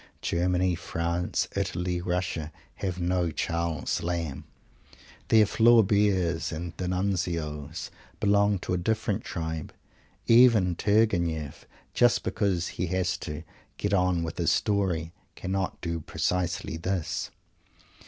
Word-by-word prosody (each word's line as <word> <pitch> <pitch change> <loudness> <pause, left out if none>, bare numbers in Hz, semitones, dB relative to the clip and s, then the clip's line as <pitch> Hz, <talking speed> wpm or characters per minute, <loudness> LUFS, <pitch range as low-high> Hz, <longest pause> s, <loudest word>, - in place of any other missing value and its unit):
Germany, 90 +1 +1
France, 85 +1 -1
Italy, 90 0 -1
Russia 90 -3 -2 0.3
have 90 -2 -3
no 90 0 +1
Charles 85 +1 -2
Lamb. 85 -5 -3 0.8
Their 110 -1 +6
Flauberts 100 -6 +3
and 85 +1 -5
D'Annunzios 90 -5 -2 0.3
belong 100 0 +3
to - - -2
a 90 - +1
different 110 +2 -1
tribe. 80 -2 -4 0.5
Even 115 -7 +6
Turgenieff, 85 -8 +1 0.3
just 120 -1 +4
because 95 -5 0
he 90 - -3
has 90 0 0
to 75 +1 -6 0.3
"get - - -1
on 90 -3 +2
with 80 0 -5
his - - +3
story" 90 -6 0 0.2
cannot 95 0 -2
do 85 -1 -2
precisely 85 +1 -2
this. 90 -1 -2
90 Hz, 110 wpm, -27 LUFS, 85-100 Hz, 0.8 s, Their